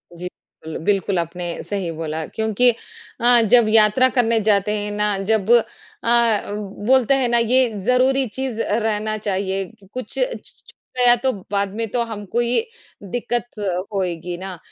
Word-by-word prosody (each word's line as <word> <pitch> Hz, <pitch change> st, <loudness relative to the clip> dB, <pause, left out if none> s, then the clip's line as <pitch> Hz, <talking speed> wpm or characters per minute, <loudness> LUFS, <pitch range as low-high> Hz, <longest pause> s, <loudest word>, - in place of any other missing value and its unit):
जी, 180 Hz, +1 st, -6 dB, 0.4 s
bill 160 Hz, -, -5 dB
बिल्कुल, 195 Hz, -2 st, +1 dB
आपने 170 Hz, +1 st, -4 dB
सही 195 Hz, -4 st, -3 dB
बोला, 160 Hz, 0 st, -4 dB
क्योंकि 220 Hz, +5 st, +1 dB, 0.5 s
अ, 240 Hz, 0 st, +5 dB
जब 240 Hz, -3 st, +6 dB
यात्रा 220 Hz, +4 st, +5 dB
करने 230 Hz, -2 st, +3 dB
जाते 210 Hz, 0 st, +2 dB
हैं 205 Hz, 0 st, -4 dB
ना, 210 Hz, -1 st, 0 dB
जब 220 Hz, 0 st, +1 dB
अ, 235 Hz, -2 st, +1 dB, 0.4 s
बोलते 260 Hz, 0 st, +4 dB
हैं 260 Hz, -2 st, +1 dB
ना, 240 Hz, -, +3 dB
ये 245 Hz, +2 st, +3 dB, 0.2 s
ज़रूरी 260 Hz, +2 st, +3 dB
चीज़ 245 Hz, 0 st, -4 dB
अ, 210 Hz, -, 0 dB
रहना 215 Hz, 0 st, -1 dB
चाहिए 195 Hz, -1 st, -2 dB
कि 195 Hz, +2 st, -19 dB
कुछ 255 Hz, 0 st, -6 dB
छ -, -, +4 dB, 0.2 s
छूट -, -, -14 dB, 0.2 s
गया, 245 Hz, -1 st, +6 dB
तो 260 Hz, +2 st, 0 dB, 0.2 s
बाद 200 Hz, -1 st, -1 dB
में 225 Hz, 0 st, -2 dB
तो 240 Hz, 0 st, +1 dB
हमको 220 Hz, 0 st, -3 dB
ये 240 Hz, -, +1 dB, 0.5 s
दिक्कत 240 Hz, -1 st, -3 dB, 0.3 s
होएगी 175 Hz, -2 st, -3 dB
ना। 185 Hz, 0 st, -7 dB
215 Hz, 160 wpm, -21 LUFS, 195-240 Hz, 0.5 s, जब